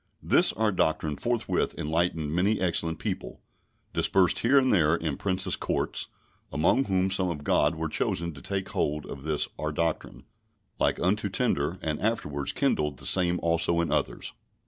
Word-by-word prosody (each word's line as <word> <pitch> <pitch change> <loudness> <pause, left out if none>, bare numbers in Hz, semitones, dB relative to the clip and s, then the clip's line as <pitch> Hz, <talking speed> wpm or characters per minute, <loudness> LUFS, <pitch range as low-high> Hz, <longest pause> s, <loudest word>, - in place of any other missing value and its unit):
This - - +4
our 110 0 +1
Doctrine 80 -4 0
forthwith 120 - -1
enlightened 80 -1 -1
many 100 +5 +2
excellent 85 -3 0
people, - - -5 0.5
dispersed 95 -2 +3
here 130 +4 +4
and 130 -1 +4
there 80 -4 +4
in 80 -4 -2
Princes' 95 +2 -1
courts, - - -2 0.4
among 85 - +2
whom 95 -1 +1
some 95 -1 +1
of 75 -4 -5
God 75 +2 +2
were 80 0 -2
chosen 85 +2 -1
to 70 - -12
take 95 +3 -3
hold 75 0 -1
on 70 - -8
this 75 -1 -1
our 75 0 -2
doctrine, 80 +1 -2 0.6
like - - +1
unto 100 +3 +1
tinder, 90 - 0
and 75 -1 -2
afterwards 75 -10 -1
kindled 75 -3 0
the - - -11
same 90 -1 +2
also 85 0 +2
in 85 - 0
others. - - -2
85 Hz, 165 wpm, -27 LUFS, 75-95 Hz, 0.6 s, This